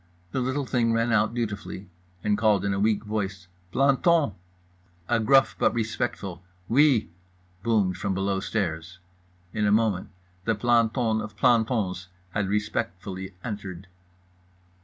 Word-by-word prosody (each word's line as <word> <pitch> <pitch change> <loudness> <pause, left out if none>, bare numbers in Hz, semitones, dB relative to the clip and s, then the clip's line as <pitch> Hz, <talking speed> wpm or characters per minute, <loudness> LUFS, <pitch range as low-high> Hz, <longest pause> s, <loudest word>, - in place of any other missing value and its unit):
The 130 - -1
little 130 +3 -1
thing 120 -2 +1
ran 115 +1 +1
out 110 +1 +2
dutifully 105 -4 -4 0.4
and 105 -1 +2
called 105 -2 +2
in 100 - +1
a 95 - -1
weak 105 +1 +2
voice 100 -4 -3 0.2
"Planton!" 140 - +3 0.7
A 120 - +2
gruff 135 +5 +4
but - - +2
respectful 110 -5 -3 0.3
"Oui" 130 - +4 0.5
boomed 100 -5 +1
from 95 0 -2
below 95 0 0
stairs. 85 -4 -3 0.6
In 105 -1 +1
a - - +3
moment 105 -4 +2 0.4
the 115 - +2
planton 115 0 +2
of 105 - -8
plantons 110 -7 +2 0.2
had 100 0 -1
respectfully 95 -2 -3
entered. 100 -5 -6
105 Hz, 130 wpm, -26 LUFS, 95-115 Hz, 0.7 s, gruff